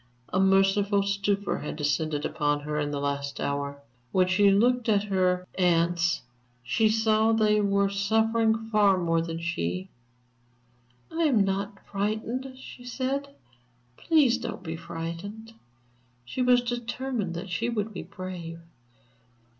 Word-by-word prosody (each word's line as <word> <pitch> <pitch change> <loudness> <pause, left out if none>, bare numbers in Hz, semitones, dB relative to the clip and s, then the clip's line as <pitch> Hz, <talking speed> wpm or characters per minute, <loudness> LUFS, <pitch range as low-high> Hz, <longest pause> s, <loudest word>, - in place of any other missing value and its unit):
A 185 - +2
merciful 195 +1 +3
stupor 200 0 0
had 150 - -5
descended 150 0 -1
upon 145 -1 0
her 150 +1 -3
in 145 -1 -1
the 145 -1 -3
last 140 0 -3
hour; 140 0 -3 0.3
when 185 -1 +4
she 200 +2 +4
looked 240 +4 +3
at 205 -2 +3
her 185 -2 +1
aunts, 170 -2 +2 0.4
she 215 - +2
saw 220 0 +3
that 225 -1 +2
they 210 0 +4
were 200 0 +2
suffering 220 +3 +2 0.2
far 205 -3 +4
more 165 -2 +1
than 165 0 -4
she. 90 - -3 1.2
"I 330 0 +1
am 240 -9 +4
not 200 +1 -3
frightened," 220 +6 -2
she 255 -1 -11
said, 270 +3 -3 0.6
"please 295 - +3
don't - - -6
be 165 -2 -4
frightened." 170 +7 -7 0.7
She 190 - -4
was 250 0 +5
determined 240 -5 -3
that 180 +2 -6
she 230 +6 -1
would 220 -2 -2
be 185 - -5
brave. 180 -3 -7
200 Hz, 140 wpm, -27 LUFS, 170-225 Hz, 1.2 s, was